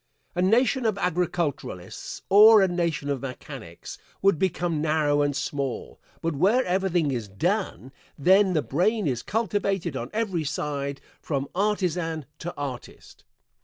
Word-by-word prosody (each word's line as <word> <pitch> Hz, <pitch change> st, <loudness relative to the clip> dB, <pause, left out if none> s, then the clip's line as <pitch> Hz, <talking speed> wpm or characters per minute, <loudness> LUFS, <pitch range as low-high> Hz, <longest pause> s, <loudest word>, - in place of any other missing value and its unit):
A 180 Hz, -, -1 dB
nation 240 Hz, +7 st, +3 dB
of 215 Hz, -2 st, 0 dB
agriculturalists 170 Hz, -, -3 dB
or 210 Hz, +1 st, +8 dB
a -, -, +4 dB
nation 170 Hz, -5 st, -1 dB
of 140 Hz, -2 st, -1 dB
mechanics 130 Hz, -2 st, -8 dB, 0.2 s
would 195 Hz, -5 st, +4 dB
become 175 Hz, -4 st, 0 dB
narrow 150 Hz, -2 st, +2 dB
and 145 Hz, -1 st, 0 dB
small, 140 Hz, -2 st, -4 dB, 0.2 s
but 165 Hz, -2 st, -1 dB
where 205 Hz, -, +3 dB
everything 180 Hz, -5 st, +1 dB
is 120 Hz, -5 st, -3 dB
done, 170 Hz, -, -2 dB, 0.3 s
then 190 Hz, +5 st, +4 dB
the 155 Hz, -4 st, +1 dB
brain 205 Hz, +8 st, +1 dB
is 125 Hz, -5 st, -1 dB
cultivated 200 Hz, -7 st, -1 dB
on 120 Hz, 0 st, -4 dB
every 205 Hz, -7 st, -1 dB
side, 140 Hz, -1 st, -3 dB, 0.2 s
from 140 Hz, -2 st, -2 dB
artisan 180 Hz, -6 st, -1 dB
to 175 Hz, -, -4 dB
artist. 135 Hz, -4 st, -8 dB
170 Hz, 135 wpm, -25 LUFS, 145-195 Hz, 0.3 s, or